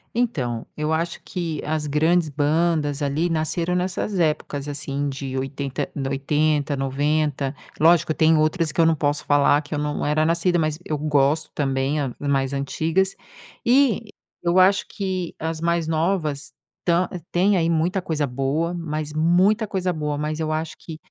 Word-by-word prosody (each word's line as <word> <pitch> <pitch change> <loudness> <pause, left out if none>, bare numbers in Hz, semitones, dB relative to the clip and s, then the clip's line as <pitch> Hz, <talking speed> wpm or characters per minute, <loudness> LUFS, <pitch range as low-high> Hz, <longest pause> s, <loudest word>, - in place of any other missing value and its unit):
Então, 130 - -1
eu 150 +1 -2
acho 165 +2 -1
que 165 -5 -4
as 155 0 -2
grandes 160 +3 +2
bandas, 150 0 +1
ali, 150 +5 0
nasceram 165 +2 -1
nessas 185 +2 -1
épocas 150 -3 -1
assim 145 0 -3
de 135 -1 -4
80 135 0 -3
de 135 -2 -2
80, 145 +1 +1
90. 140 +1 0 0.2
Lógico 165 0 +4
tem 160 +1 +4
outras 155 +1 +1
que 165 - +1
eu 165 - +5
não 165 - +3
posso 145 0 -1
falar 145 0 +4
que 145 - -9
eu - - -1
não 150 0 -2
era 155 +1 +2
nascida, 170 +2 +2
mas 155 -1 0
eu 150 - -2
gosto 150 +1 +1
também, 135 +1 0
a 135 -3 -2
mais 135 -1 0
antigas. 160 +7 0 0.5
E 240 -3 +3 0.3
eu 175 +2 +2
acho 190 +2 +5
que 185 -4 -4
as 160 0 -4
mais 170 -1 +1
novas, 160 -3 -1 0.3
ta 175 +1 +2 0.2
tem 190 +3 +3
aí, 165 -2 +2
muita 170 +4 +1
coisa 155 -4 -1
boa, 140 +6 -1
mas 155 -3 -4
muita 185 +8 +3
coisa 185 -3 -1
boa. 150 -2 -2
Mas 150 +1 -3
eu 155 -1 -1
acho 155 0 -3
que, 160 -2 -8
155 Hz, 165 wpm, -23 LUFS, 145-170 Hz, 0.5 s, eu